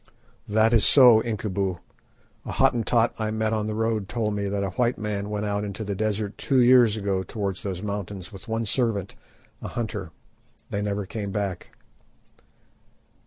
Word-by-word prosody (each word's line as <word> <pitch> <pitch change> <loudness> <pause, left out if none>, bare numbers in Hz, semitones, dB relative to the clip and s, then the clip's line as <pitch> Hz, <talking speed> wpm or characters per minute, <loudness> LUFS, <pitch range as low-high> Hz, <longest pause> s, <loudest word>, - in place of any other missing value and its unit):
"That 110 +2 +3
is 110 -4 +4
so, 125 -5 +7
Incubu; 100 -5 -2 0.7
a - - -6
Hottentot 115 0 +2
I 110 -1 -1
met 110 0 -1
on 110 -1 -1
the 110 - -3
road 110 -3 -1
told 110 -3 -1
me 100 -1 -2
that 100 0 -1
a 95 - -2
white 120 +4 0
man 105 -1 -3
went 105 0 -2
out 105 0 -1
into 105 +1 -5
the 100 -1 -3
desert 105 0 -2
two 135 -2 +2
years 120 -3 +6
ago 100 -2 -1
towards 100 0 -4
those 95 -1 -4
mountains 100 -3 -5
with 95 - -11
one 115 0 -1
servant, 105 -4 -1 0.5
a - - -5
hunter. 115 -2 -4 0.6
They 100 - -1
never 100 -1 -2
came 100 +1 -5
back." 100 -3 -4
105 Hz, 165 wpm, -25 LUFS, 100-110 Hz, 0.7 s, so